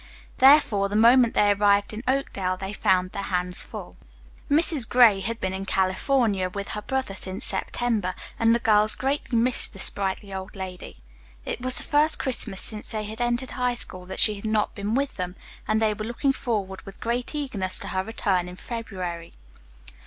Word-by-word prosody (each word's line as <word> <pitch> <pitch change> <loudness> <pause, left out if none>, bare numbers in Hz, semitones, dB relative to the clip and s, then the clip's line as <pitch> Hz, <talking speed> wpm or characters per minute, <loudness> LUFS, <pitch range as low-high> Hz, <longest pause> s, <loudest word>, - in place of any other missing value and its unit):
Therefore, 260 -8 +5
the 205 - -4
moment 235 +2 +5
they 205 0 +4
arrived 200 0 +2
in 215 - -6
Oakdale 195 -9 -1
they 190 +2 -6
found 185 -3 +1
their 200 - -5
hands 180 -1 -1
full. - - -9 0.5
Mrs. 295 -4 +2
Gray 235 -5 +6
had 225 +4 -4
been 190 -2 -2
in 190 0 -4
California 195 +1 0
with 200 +2 -6
her 210 - -4
brother 265 -3 -3
since 190 0 -2
September, 205 -1 -1 0.2
and 230 0 +4
the - - +3
girls 215 -2 +3
greatly 270 -2 -2
missed 245 +2 +2
the - - -12
sprightly 195 0 +2
old 190 +2 -7
lady. 185 -2 -8 0.5
It - - -4
was 255 0 +1
the - - 0
first 300 +2 +2
Christmas 230 -7 +1
since 215 -1 -1
they 215 -1 -3
had 220 +3 -7
entered 240 +2 -1
High 250 -1 -1
School 185 -6 -1
that 190 - -6
she 215 - +5
had 200 +1 -9
not 215 -1 0
been 205 +3 -3
with 275 +1 -2
them, 180 -1 -4 0.3
and 215 0 +1
they 220 -1 +1
were 215 +1 -6
looking 255 +4 0
forward 205 -7 -3
with 195 - -13
great 240 +5 -3
eagerness 220 -11 0
to - - -5
her 185 0 -1
return 190 -4 -1
in 180 - -10
February. 185 -7 -6
210 Hz, 190 wpm, -25 LUFS, 190-240 Hz, 0.5 s, Gray